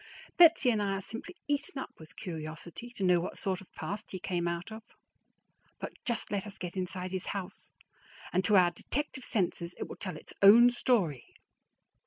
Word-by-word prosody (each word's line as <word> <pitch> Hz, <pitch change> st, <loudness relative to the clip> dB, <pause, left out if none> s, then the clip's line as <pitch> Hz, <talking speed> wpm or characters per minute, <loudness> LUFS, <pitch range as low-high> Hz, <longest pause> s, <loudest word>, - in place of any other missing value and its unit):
Betsy 330 Hz, -7 st, +7 dB
and 215 Hz, -2 st, +1 dB
I 200 Hz, -1 st, 0 dB
are 195 Hz, -, -2 dB
simply 230 Hz, -, -6 dB
eaten 285 Hz, -1 st, -1 dB
up 265 Hz, -, -5 dB
with 160 Hz, -1 st, -13 dB
curiosity 165 Hz, +6 st, -7 dB
to 195 Hz, -, -3 dB
know 180 Hz, -1 st, +5 dB
what 170 Hz, -, -4 dB
sort 190 Hz, -2 st, -2 dB
of 190 Hz, -, -16 dB
past 205 Hz, +2 st, -5 dB
he 185 Hz, -, -4 dB
came 175 Hz, -1 st, -1 dB
out 170 Hz, +4 st, -3 dB
of; 220 Hz, +1 st, -7 dB, 1.0 s
but -, -, -5 dB
just 235 Hz, -2 st, -2 dB
let 205 Hz, 0 st, -1 dB
us 200 Hz, -, -7 dB
get 180 Hz, 0 st, -6 dB
inside 185 Hz, 0 st, -3 dB
his 185 Hz, -1 st, -3 dB
house, 195 Hz, 0 st, -8 dB, 0.6 s
and 185 Hz, +2 st, +3 dB
to 210 Hz, -, +4 dB
our 175 Hz, -2 st, +6 dB
detective 265 Hz, +8 st, -4 dB
senses 175 Hz, -6 st, -1 dB
it -, -, -4 dB
will -, -, -7 dB
tell 185 Hz, -5 st, -5 dB
its -, -, -9 dB
own 230 Hz, +5 st, +9 dB
story. 195 Hz, -, 0 dB
190 Hz, 190 wpm, -31 LUFS, 175-225 Hz, 1.0 s, own